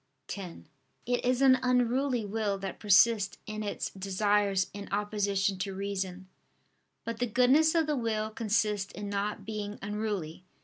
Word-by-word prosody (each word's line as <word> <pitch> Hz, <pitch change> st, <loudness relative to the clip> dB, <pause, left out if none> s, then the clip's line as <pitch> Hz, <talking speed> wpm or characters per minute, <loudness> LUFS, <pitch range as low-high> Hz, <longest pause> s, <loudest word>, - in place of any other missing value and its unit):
x): 185 Hz, -4 st, -7 dB, 0.5 s
"It 245 Hz, 0 st, 0 dB
is 255 Hz, +2 st, +2 dB
an 260 Hz, -1 st, +6 dB
unruly 250 Hz, -1 st, +1 dB
will 205 Hz, -1 st, -1 dB
that 195 Hz, -1 st, -6 dB
persists 205 Hz, -1 st, +4 dB
in 215 Hz, 0 st, -5 dB
its 205 Hz, -1 st, -3 dB
desires 195 Hz, 0 st, +1 dB
in 200 Hz, 0 st, -8 dB
opposition 200 Hz, -1 st, 0 dB
to 190 Hz, +1 st, -3 dB
reason." 190 Hz, -1 st, -4 dB, 0.8 s
But 230 Hz, -1 st, -5 dB
the 245 Hz, -, +1 dB
goodness 260 Hz, +8 st, +4 dB
of 325 Hz, -1 st, +3 dB
the 300 Hz, 0 st, 0 dB
will 220 Hz, -3 st, -1 dB
consists 210 Hz, -2 st, 0 dB
in 205 Hz, -1 st, -6 dB
not 205 Hz, 0 st, -2 dB
being 210 Hz, -1 st, -5 dB
unruly. 200 Hz, -5 st, -4 dB
210 Hz, 145 wpm, -30 LUFS, 195-230 Hz, 0.8 s, an